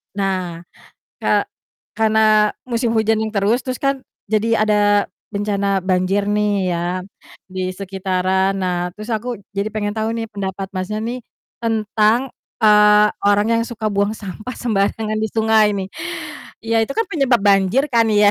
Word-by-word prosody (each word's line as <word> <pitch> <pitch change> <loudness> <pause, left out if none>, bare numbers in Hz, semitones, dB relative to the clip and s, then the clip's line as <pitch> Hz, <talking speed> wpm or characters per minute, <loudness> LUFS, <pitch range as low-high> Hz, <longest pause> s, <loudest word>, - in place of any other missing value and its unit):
Nah, 185 -4 -2 0.6
ka - - +2 0.5
karena 215 -1 +4
musim 235 -1 -1
hujannya 220 0 +2
terus, 210 +4 +2
terus 255 -1 -3
kan 275 -1 +1 0.3
jadi 215 +1 +2 0.2
ada 215 -1 +2 0.6
bencana 200 -1 0
banjir 185 +2 +1
nih 210 0 +1 0.2
ya 175 - -1 0.8
di 185 - -3
sekitaran, 190 0 0
nah 180 -1 0 0.2
terus 215 +4 -9
aku 220 +3 -3 0.3
jadi 200 +2 0
pengen 205 -1 -1
tau 220 +1 0
nih 230 -1 -3
pendapat 195 -1 -4
Masnya 190 +3 -3
nih 235 +3 -3 0.4
tentang, 225 +2 +1 0.3
eee, 210 -1 +6 0.2
orang 205 +1 +3
yang 230 0 +2
suka 225 -2 -6
buang 200 +2 +1
sampah 210 +5 -7
sembarangan 215 -1 0
di - - 0
sungai 220 -1 +4
nih? 190 - -3 0.8
Iya, 230 0 0
itu 275 - -6
kan 450 - +2
penyebab 270 -7 +2
banjir 195 +6 +4
kan 230 -1 +5 0.2
ya. 205 - +7
210 Hz, 145 wpm, -19 LUFS, 195-225 Hz, 0.8 s, ya